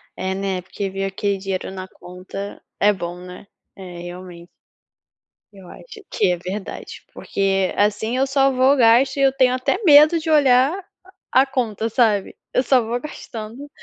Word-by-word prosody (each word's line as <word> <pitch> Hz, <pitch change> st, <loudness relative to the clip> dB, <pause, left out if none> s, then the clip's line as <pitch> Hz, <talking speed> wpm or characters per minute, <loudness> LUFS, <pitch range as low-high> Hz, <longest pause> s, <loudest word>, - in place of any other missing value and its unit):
É, 190 Hz, 0 st, -3 dB
né, 190 Hz, -1 st, -3 dB
porque 195 Hz, +2 st, -5 dB
ver 195 Hz, +1 st, -3 dB
aquele 195 Hz, +1 st, -2 dB
dinheiro 190 Hz, -1 st, -4 dB
na 190 Hz, -1 st, -7 dB
conta 185 Hz, +3 st, -9 dB, 0.2 s
é 205 Hz, -, +5 dB
bom, 175 Hz, -1 st, -6 dB
né. 180 Hz, +2 st, -11 dB, 0.3 s
É 180 Hz, -3 st, -10 dB
realmente. 175 Hz, -1 st, -10 dB, 1.1 s
Eu 190 Hz, -2 st, -14 dB
acho 440 Hz, -4 st, -13 dB
que 195 Hz, -4 st, +1 dB
é 175 Hz, -, -1 dB
verdade, 190 Hz, +3 st, -7 dB
porque 195 Hz, -1 st, -1 dB
assim 210 Hz, +4 st, 0 dB
eu 270 Hz, -, +1 dB
só 270 Hz, 0 st, +2 dB
vou 260 Hz, +2 st, +3 dB
gasto 255 Hz, +2 st, +4 dB
e -, -, 0 dB
eu 270 Hz, -1 st, +4 dB
tenho 255 Hz, -1 st, +2 dB
até 255 Hz, -, -1 dB
medo 305 Hz, 0 st, +7 dB
de 320 Hz, 0 st, -5 dB
olhar 290 Hz, +4 st, +3 dB, 0.5 s
a 260 Hz, +1 st, +5 dB
conta, 225 Hz, -5 st, -2 dB
sabe. 220 Hz, -4 st, +1 dB, 0.2 s
Eu 255 Hz, -, +2 dB
só 255 Hz, 0 st, +3 dB
vou 235 Hz, +2 st, -3 dB
gastando 240 Hz, -1 st, -9 dB
215 Hz, 165 wpm, -21 LUFS, 190-265 Hz, 1.1 s, medo